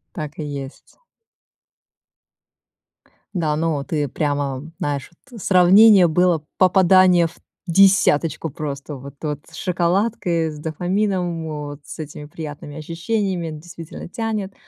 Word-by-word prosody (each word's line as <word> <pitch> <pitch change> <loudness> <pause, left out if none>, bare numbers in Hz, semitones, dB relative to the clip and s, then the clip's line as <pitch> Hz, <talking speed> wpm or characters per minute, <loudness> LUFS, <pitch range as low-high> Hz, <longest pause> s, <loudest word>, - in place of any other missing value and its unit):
Так 150 0 -6
и 155 - -3
есть. 140 -2 -8 2.4
Да, 155 -5 0
ну 155 -2 0
ты 150 -2 -1
прямо 145 0 -2
знаешь, 145 -6 -3 0.2
вот 230 - -9
сравнение 190 +2 +7
было 170 -1 +2
попадание 185 -1 +5
в 165 - -11 0.3
десяточку 170 -4 +3
просто 145 0 -6
вот 140 +1 -10
вот, 150 -2 -3
с - - -12
шоколадкой, 175 -2 0
с 150 - -9
дофамином 175 +1 -1
вот 145 -1 -6
с - - -10
этими 150 -1 -7
приятными 145 -1 -8
ощущениями. 170 +2 -2
Действительно 165 +2 -9
тянет. 215 -2 -3
165 Hz, 115 wpm, -21 LUFS, 150-185 Hz, 2.4 s, сравнение